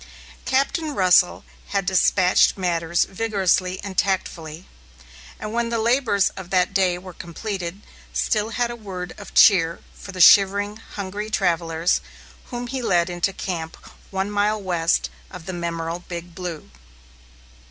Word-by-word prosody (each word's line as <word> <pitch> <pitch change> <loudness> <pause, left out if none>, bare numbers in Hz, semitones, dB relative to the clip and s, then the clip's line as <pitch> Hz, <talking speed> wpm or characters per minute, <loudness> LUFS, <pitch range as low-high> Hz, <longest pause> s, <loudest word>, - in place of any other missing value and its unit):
Captain 280 +3 0
Russell 180 -2 +4 0.2
had 200 -2 -1
despatched 185 0 +3
matters 170 -2 +1
vigorously 190 -3 0
and 195 -2 -2
tactfully, 170 -4 -2 0.7
and 215 0 -5
when 235 0 0
the 230 - -1
labors 230 -3 +2
of 190 -2 -10
that 185 0 +2
day 185 -2 +2
were 185 0 -10
completed, 185 +2 -6 0.3
still 215 -1 0
had 240 +1 -1
a - - -5
word 185 -5 -7
of 205 - -11
cheer 170 -7 +5
for 195 - -10
the 185 - -8
shivering, 200 +3 +6
hungry 205 -1 -6
travellers, 170 -4 +1 0.4
whom 245 0 -5
he 260 +1 -4
led 180 -6 +1
into 175 +2 0
camp 170 -4 -5 0.3
one 195 +1 -2
mile 210 +1 +1
west 175 -4 0 0.2
of 180 -3 -10
the 185 - -5
memorable 170 -1 -3
Big 175 0 -7
Blue. 170 - -7
190 Hz, 140 wpm, -22 LUFS, 175-210 Hz, 0.7 s, shivering